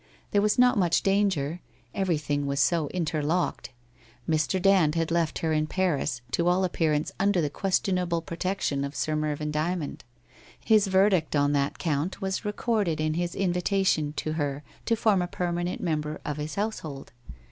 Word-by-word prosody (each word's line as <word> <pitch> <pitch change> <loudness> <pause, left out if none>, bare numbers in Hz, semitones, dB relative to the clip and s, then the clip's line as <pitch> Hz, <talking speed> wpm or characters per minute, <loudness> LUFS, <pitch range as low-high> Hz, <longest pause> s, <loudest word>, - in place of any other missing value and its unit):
There 205 - +3
was 210 0 +2
not 250 -3 +5
much 175 -3 +2
danger; 190 -5 +1 0.3
everything 150 -6 -1
was 140 0 -1
so 160 +1 +2
inter 160 -1 -2
locked. 170 +5 -1 0.6
Mr. 160 +3 +1
Dand 185 -5 +4
had 165 0 0
left 165 -2 +1
her 160 - +1
in 155 0 +1
Paris, 155 -7 0
to 170 +6 +1
all 180 +2 +3
appear 165 -3 +1
ance 150 +1 0
under 200 -1 +2
the 150 -4 0
questionable 180 -1 0
protection 170 -5 -2
of 140 +1 -5
Sir 155 - -1
Mervyn 150 0 -2
Dymond; 155 0 -2 0.6
his 215 -2 +3
verdict 190 -5 +3
on 145 0 +3
that 140 0 0
count 160 +3 -2
was 190 0 -2
recorded 210 -5 0
in 155 0 0
his 175 +1 -2
invitation 180 -4 +1
to 155 +1 -3
her 145 -2 -2 0.2
to 230 - +3
form 210 -4 +2
a 175 - -1
permanent 175 0 -2
member 155 -3 -2
of 150 -1 -3
his 150 +1 -4
household. 165 -10 -4
170 Hz, 170 wpm, -27 LUFS, 150-190 Hz, 0.6 s, not